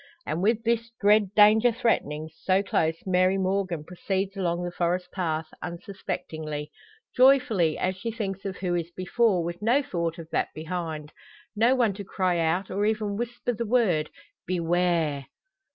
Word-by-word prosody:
And 160 - -2
with 225 +3 +2
this 230 0 0
dread 205 -1 +4
danger 215 +3 +6
threatening 160 -10 -1
so 190 +1 +1
close 165 -4 +1
Mary 185 0 +3
Morgan 190 -4 -1
proceeds 190 +3 -3
along 175 -2 -1
the 175 - -3
forest 175 +1 -1
path, 165 -4 -2 0.2
unsuspectingly: 160 -4 -5 0.4
joyfully, 250 - +4
as 185 +1 -1
she 230 - -4
thinks 195 -4 -4
of 195 -2 -4
who 180 -2 -2
is 170 -1 -1
before, 185 +1 +1
with 170 +2 -5
no 245 +7 +3
thought 170 -6 -2
of 165 -2 -8
that - - +1
behind 160 -2 -5 0.4
no 235 +5 +4
one 235 -5 +2
to 200 +1 -7
cry 185 -2 0
out, 170 +4 0
or 200 +2 -1
even 215 -2 -1
whisper, 240 +2 -3
the 235 +1 -3
word: 205 -10 +2 0.4
"Beware!" 170 -4 +1
185 Hz, 155 wpm, -26 LUFS, 170-210 Hz, 0.4 s, danger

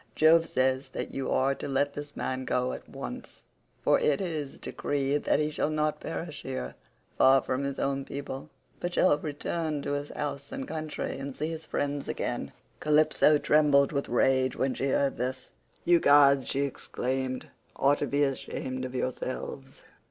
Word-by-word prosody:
Jove 165 +1 +5
says 130 0 +1
that - - -4
you 135 - -2
are 135 +1 +2
to - - -6
let 140 +1 +1
this 145 0 -7
man 130 0 -2
go 125 0 0
at - - -9
once, - - -8 0.4
for - - +4
it 145 - +2
is 155 -7 -3
decreed 145 0 -1
that - - +3
he 150 0 0
shall 150 - 0
not 155 0 0
perish 165 -1 -5
here, 130 - -4 0.5
far 135 +1 +7
from 130 +1 -2
his 140 -1 -3
own 135 0 -1
people, 140 +1 -6 0.3
but 175 0 -3
shall 150 -5 +4
return 155 0 -3
to - - -2
his 145 0 -2
house 140 -2 -4
and 270 0 -5
country 155 -3 -4
and 135 -1 -6
see 155 +2 -1
his 160 0 -6
friends 145 0 -2
again." - - -3 0.3
Calypso 150 0 +4
trembled 145 -2 +4
with 140 -1 -2
rage 130 +1 +2
when 130 0 0
she 135 - -1
heard 140 0 +1
this, 130 +2 -3 0.4
"You 175 0 +5
gods," 140 -2 +6
she 140 - 0
exclaimed, 130 -1 -3 0.3
"ought 140 +1 +3
to 145 - -1
be 140 +3 +2
ashamed 130 -1 -3
of 130 0 -7
yourselves. 130 +1 -4
140 Hz, 175 wpm, -29 LUFS, 135-150 Hz, 0.5 s, far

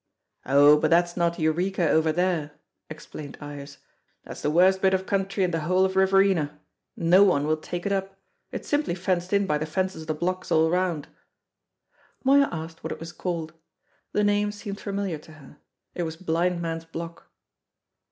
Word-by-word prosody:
"Oh, 145 +2 +7
but - - +1
that's 175 +1 +3
not 170 -1 0
Eureka 175 +3 0
over 160 +1 +3
there," 170 -3 -1 0.4
explained 155 -2 -9
Ives; 145 -1 -9 0.5
"that's - - -9
the - - 0
worst 185 +4 +4
bit 190 0 +4
of 190 0 -3
country 195 0 0
in 180 - +1
the 165 - -1
whole 185 +4 +2
of 190 0 -2
Riverina. 190 -6 +3 0.4
No 175 +3 +5
one 160 -8 +3
will 155 +1 +2
take 175 +3 -6
it 200 - 0
up; 195 0 -2 0.3
it's - - -6
simply 290 - 0
fenced 180 -1 -1
in 200 0 +3
by 150 -5 0
the 155 - -3
fences 185 +1 -2
of 160 - -10
the 155 - -1
blocks 185 +3 -3
all 160 0 +4
round." 180 -4 0 1.2
Moya 280 +1 +5
asked 160 0 -7
what - - -4
it - - -5
was 165 0 -7
called. 170 -4 -4 0.6
The 210 - +1
name 205 0 +2
seemed 205 -1 -7
familiar 200 -5 -3
to 155 - -15
her. 150 -2 -16 0.4
It - - -4
was 160 -1 -3
Blind 170 +1 -1
Man's 165 0 -4
Block. 165 +1 -8
175 Hz, 180 wpm, -25 LUFS, 160-190 Hz, 1.2 s, Oh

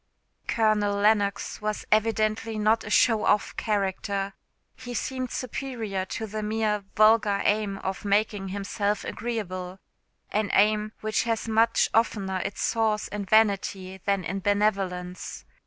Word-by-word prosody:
Colonel 215 -2 +2
Lennox 200 -1 +1
was 215 0 -3
evidently 220 0 +1
not 215 +2 +2
a - - -7
show 220 0 +4
off 210 - +2
character. 200 -1 -1 0.4
He 245 -1 -8
seemed 255 0 -3
superior 230 -7 -4
to 220 - -4
the 215 0 -5
mere 210 -1 0
vulgar 215 -2 +4
aim 205 -1 +1
of 190 +1 -4
making 205 -1 +1
himself 200 +1 -2
agreeable 190 -5 -4 0.5
an 210 0 0
aim 215 +1 +3
which 215 +1 0
has 230 -1 -1
much 225 +1 +3
oftener 200 -4 +1
its 200 - -4
source 220 -2 0
in 205 -1 -4
vanity 195 -3 +1
than 200 -2 0
in 190 +4 -3
benevolence. 195 -3 -1
210 Hz, 130 wpm, -26 LUFS, 200-220 Hz, 0.5 s, show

